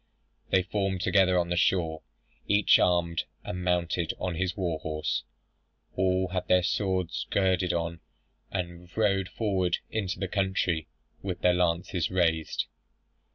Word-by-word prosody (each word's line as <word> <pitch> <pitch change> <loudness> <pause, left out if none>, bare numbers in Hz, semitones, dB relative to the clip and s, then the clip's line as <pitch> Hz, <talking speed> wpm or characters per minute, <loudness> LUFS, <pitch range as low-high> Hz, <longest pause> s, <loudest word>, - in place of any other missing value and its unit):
They 95 - +3
formed 95 -1 -1
together 95 -1 +4
on 85 -1 +1
the 90 - 0
shore, 85 -3 +1 0.5
each 100 0 +5
armed, 85 -2 +2 0.2
and 90 0 -5
mounted 85 -2 0
on 90 -1 -2
his 90 +1 -2
war 85 -5 -1
horse: 75 -1 -2 0.7
all 95 0 +1
had 90 0 -3
their 90 -1 +4
swords 95 -2 -1
girded 95 -2 +2
on, 85 -1 -2 0.5
and 90 -2 -5
rode 100 -4 +2
forward 95 -6 0
into 100 -5 -2
the 95 +1 -2
country 95 -4 0 0.3
with 95 -2 -4
their 90 - +4
lances 90 0 0
raised. 85 -3 +1
90 Hz, 135 wpm, -28 LUFS, 85-95 Hz, 0.7 s, each